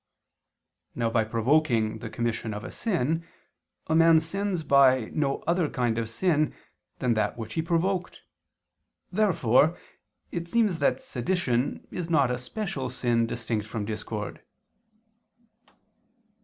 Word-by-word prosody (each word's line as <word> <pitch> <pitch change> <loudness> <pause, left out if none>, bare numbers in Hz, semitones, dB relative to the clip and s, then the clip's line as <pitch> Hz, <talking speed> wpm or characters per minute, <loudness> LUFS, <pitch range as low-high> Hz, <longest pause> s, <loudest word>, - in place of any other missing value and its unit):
Now, 115 -2 0
by 115 -1 +3
provoking 115 -1 +1
the 115 - -6
commission 115 -2 -2
of 105 - -6
a - - -7
sin, 165 - -1 0.6
a 160 - -1
man 165 0 +6
sins 185 +1 -2
by 135 -5 +4
no 140 -3 -1
other 170 -2 +1
kind 120 -3 0
of 115 -1 -3
sin 155 +4 +1 0.4
than 125 -2 +1
that 105 0 0
which 110 -1 -6
he 160 - 0
provoked. 175 +3 -1 0.9
Therefore 175 - +3 0.5
it 170 -1 -4
seems 210 -4 +1
that 130 -3 +2
sedition 125 -2 -1
is 175 -2 -4
not 140 -6 +3
a 125 - -2
special 135 - -4
sin 120 -2 +1
distinct 115 -2 -3
from 105 -1 -4
discord. 105 -1 -5
130 Hz, 130 wpm, -27 LUFS, 115-165 Hz, 0.9 s, man